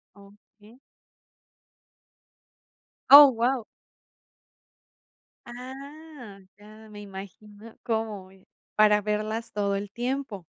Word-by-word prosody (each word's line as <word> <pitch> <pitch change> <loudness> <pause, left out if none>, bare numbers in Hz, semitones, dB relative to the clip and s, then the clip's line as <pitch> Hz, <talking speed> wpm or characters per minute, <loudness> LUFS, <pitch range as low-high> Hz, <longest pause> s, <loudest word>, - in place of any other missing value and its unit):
Okey. 205 +3 -21 2.3
Oh, 285 -1 +10
guau. 240 +1 -1 1.8
Ah, 265 -1 -11 0.2
ya 215 +1 -16
me 210 -1 -11
imagino 205 +2 -12
cómo 220 -4 -3
voy, 190 0 -21 0.3
para 210 -1 +4
verlas 215 +2 -4
todo 200 -1 -2
el 200 0 -6
tiempo. 240 -6 -5
215 Hz, 80 wpm, -25 LUFS, 205-245 Hz, 2.3 s, Oh